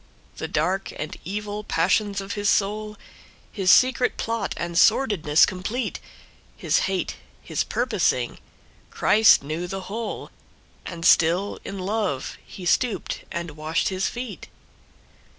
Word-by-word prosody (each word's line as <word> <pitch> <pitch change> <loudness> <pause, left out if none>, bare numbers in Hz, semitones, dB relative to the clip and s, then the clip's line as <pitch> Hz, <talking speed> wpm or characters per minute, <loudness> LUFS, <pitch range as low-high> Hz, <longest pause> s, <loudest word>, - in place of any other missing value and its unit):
The - - -4
dark 180 +6 -1
and 150 - -5
evil 210 +3 -4
passions 200 +3 +1
of 195 +1 -7
his 205 0 0
soul, 210 +1 0 0.5
His 190 -3 0
secret 255 +2 +4
plot, 225 -3 -2
and 170 0 -4
sordidness 170 - +4
complete, 210 +7 -3 0.6
His - - +2
hate, - - -2 0.3
his - - -1
purposing, - - 0 0.5
Christ 220 -8 +5
knew 155 +5 -4
the 195 +2 -5
whole, 220 +5 -5 0.6
And 170 -2 -6
still 175 +5 +4
in 200 - -6
love 195 -7 -2
he 185 - -10
stooped 205 +2 0
and 170 -1 -4
washed 155 +2 -1
his 190 0 -1
feet. 240 -8 -6
195 Hz, 125 wpm, -24 LUFS, 170-215 Hz, 0.6 s, Christ